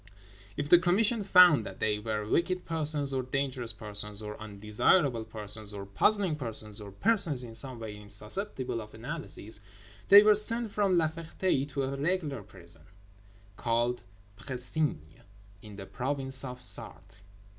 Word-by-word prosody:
If 145 - -3
the 175 - +6
Commission 205 +5 0
found 180 - +5
that - - -10
they 105 -1 -1
were 105 0 -4
wicked 180 +8 -1
persons 150 -4 +3
or 130 - -1
dangerous 130 -2 -3
persons, 105 -1 -2
or 105 -1 -6
undesirable 110 - 0
persons, 105 -1 0
or 100 -1 -8
puzzling 175 - 0
persons, 110 -5 +2
or 100 -1 -10
persons 165 - +3
in 115 -2 -10
some 125 +2 +6
way 110 -2 -8
insusceptible 110 - 0
of 105 0 -13
analysis, 115 -4 -5 0.5
they 200 +1 +9
were 210 0 +5
sent 225 +2 -1
from 200 -3 0
La 160 -2 +2
Ferté 160 -2 -3
to 140 -1 -4
a 135 +1 -4
"regular" 150 - -3
prison, 85 -3 -4 0.8
called 120 +1 -2 0.4
Précigne, 130 - -3 0.6
in 105 -2 -13
the 100 -1 -10
province 135 +2 -2
of 125 -1 -8
Sarthe. 105 -1 +1
130 Hz, 145 wpm, -28 LUFS, 105-165 Hz, 0.8 s, they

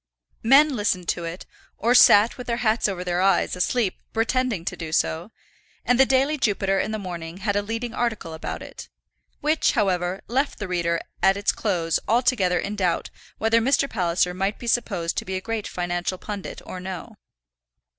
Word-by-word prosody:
Men 275 +4 +5
listened 200 -5 -1
to 170 - -1
it, 165 +2 -6 0.3
or 235 +2 +2
sat 220 -2 +7
with 250 - -9
their 235 -1 0
hats 220 0 +2
over 180 -2 -4
their 180 0 -1
eyes, 190 -1 +2
asleep, 195 +3 0 0.2
pretending 230 -4 0
to - - -3
do 160 -2 -6
so; 165 +3 0 0.6
and 245 0 +3
the 265 - +6
Daily 275 +3 +2
Jupiter 195 -4 +1
in - - -1
the 220 - -2
morning 175 -4 -6
had 200 +1 -1
a 205 - +2
leading 230 +3 -4
article 220 -10 -2
about 160 - -5
it, - - -10 0.5
which, 305 +2 +2
however, 185 -5 0
left 270 +5 0
the 205 - -5
reader 170 -2 0 0.2
at 195 +1 +4
its 200 - +2
close 170 -6 0
altogether 230 -6 +2
in 200 +4 -3
doubt 185 -4 -1 0.3
whether 225 +1 +3
Mr. 275 +3 +2
Palliser 180 -5 0
might 195 +3 -1
be - - -9
supposed 195 -8 -1
to - - 0
be 190 - -4
a - - -1
great 225 +1 -4
financial 175 +1 -2
pundit 205 0 -7
or 185 - -7
no. 185 +4 -7
200 Hz, 185 wpm, -24 LUFS, 180-235 Hz, 0.6 s, sat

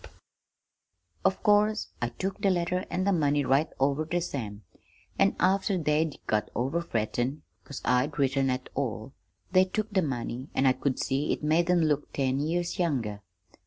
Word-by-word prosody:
"Of - - +1
course 210 +1 +3
I 120 - 0
took 190 +10 -4
the 200 - +3
letter 180 +1 0
an' 185 - -1
the 200 - +2
money 145 -4 +2
right 135 +5 +3
over 140 +3 +2
ter 170 +3 -1
Sam, 110 -11 -5 0.6
an' - - +4
after 190 +1 +2
they'd 155 -1 0
got 105 -1 0
over 135 +8 0
frettin' 125 0 -2 0.2
'cause 140 - -8
I'd 125 +4 +1
written 135 -1 +2
at 130 0 -2
all, 130 -2 -3 0.4
they 185 0 +6
took 215 +3 -3
the 195 -2 +2
money, 130 -3 -3
an' 135 - +2
I 130 - +5
could 130 0 -1
see 140 +3 0
it - - -2
made 165 +3 +2
'em 180 -1 +4
look 150 -2 0
ten 135 -1 0
years 170 +5 -1
younger. 120 - -1
145 Hz, 170 wpm, -28 LUFS, 130-175 Hz, 0.6 s, they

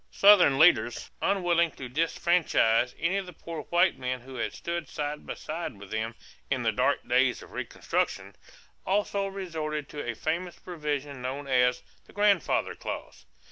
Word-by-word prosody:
Southern 195 -9 +6
leaders, 120 -7 +4
unwilling 175 -3 +2
to 130 -4 -8
disfranchise 150 -5 +2
any 185 +4 0
of 195 -2 -3
the 180 - -9
poor 165 0 -7
white 175 - +2
men 125 -1 -3
who 130 +2 -12
had 120 -3 -2
stood 170 -3 -4
side 150 0 -4
by - - -4
side 160 -7 -5
with 100 -1 -12
them 110 +1 -2 0.3
"in - - 0
the - - +2
dark - - +1
days - - +2
of - - -15
reconstruction," - - -2 0.5
also 200 0 0
resorted 160 -6 -4
to 145 - -5
a 120 -1 -3
famous 170 +7 -3
provision 145 -5 -4
known 135 +3 -4
as 125 -2 +2 0.2
"the - - -18
grandfather 205 -4 +2
clause." - - -7
155 Hz, 160 wpm, -28 LUFS, 130-175 Hz, 0.5 s, Southern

